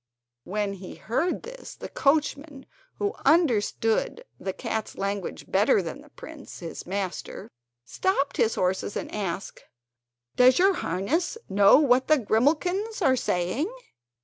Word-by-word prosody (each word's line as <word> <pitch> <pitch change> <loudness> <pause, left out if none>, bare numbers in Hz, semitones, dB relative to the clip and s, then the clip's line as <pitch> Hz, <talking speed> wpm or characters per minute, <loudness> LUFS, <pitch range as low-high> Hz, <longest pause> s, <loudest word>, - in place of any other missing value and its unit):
When 205 0 -2
he 190 -1 -9
heard 320 +11 -1
this - - -10
the - - -8
coachman, 285 -1 0 0.3
who 410 +1 -1
understood 245 - +2
the 190 - -3
cat's 220 +1 -4
language 200 -1 -3
better 200 +2 +3
than 175 +12 -6
the 300 - -17
prince, 300 0 -11
his 170 -1 -7
master, 190 -1 -4 0.3
stopped 285 - -1
his 225 - +2
horses 185 +2 -1
and - - -6
asked: 195 -2 -4 0.7
"Does 255 +1 +6
your 385 +2 +5
highness 300 - -1
know 200 +3 +6
what 260 -3 +3
the 310 - +5
grimalkins 330 - +1
are 260 -4 +4
saying?" 230 - -1
250 Hz, 130 wpm, -26 LUFS, 200-315 Hz, 0.7 s, Does